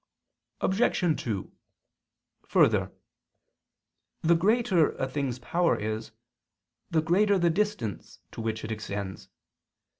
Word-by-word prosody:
Obj. 190 -5 +1
2: 105 -5 -3 1.0
Further, - - +3 1.3
the 165 +1 +5
greater 195 -2 +3
a 135 - -2
thing's 130 -2 -2
power 170 +7 +1
is, 110 +1 -3 0.8
the 160 -2 +1
greater 200 +5 +3
the 170 -2 +3
distance 160 - -2
to - - -7
which 110 -1 -3
it 110 - -4
extends. 100 -2 -5
155 Hz, 100 wpm, -28 LUFS, 110-180 Hz, 1.3 s, the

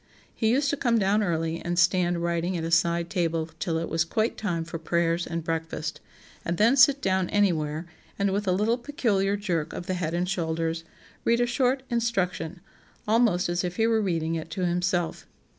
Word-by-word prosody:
He 220 - 0
used 275 +4 +2
to 290 - -1
come 240 -4 +2
down 205 +1 +2
early 165 -3 -1
and 175 0 -2
stand 175 0 +2
writing 170 +1 -1
at 165 - -3
a 165 - -3
side 170 0 +2
table 165 -3 -1
till 165 +1 -1
it 165 - -2
was 165 -1 +1
quite 215 +7 -1
time 175 -6 -2
for 165 0 -6
prayers 170 +1 0
and 165 -1 -3
breakfast, 160 -2 -3 0.4
and 170 0 -2
then 230 +5 +5
sit 275 0 +5
down 190 -1 +1
anywhere 165 -6 +1 0.3
and, 200 -1 +1
with 200 +1 -1
a - - +3
little 215 +6 +1
peculiar 205 -7 0
jerk 175 -7 -2
of 175 - -6
the 185 - -2
head 170 -2 -2
and 175 +1 0
shoulders, 165 -2 -2 0.4
read 235 +1 +3
a 245 - +3
short 255 +2 +1
'Instruction,' 190 -7 -1 0.5
almost 215 -5 +3
as 175 +1 -1
if 180 0 -3
he 225 - +2
were 225 -1 +2
reading 165 -5 -1
it 160 0 -4
to 180 +3 -2
himself. 175 -1 -1
175 Hz, 195 wpm, -26 LUFS, 165-210 Hz, 0.5 s, then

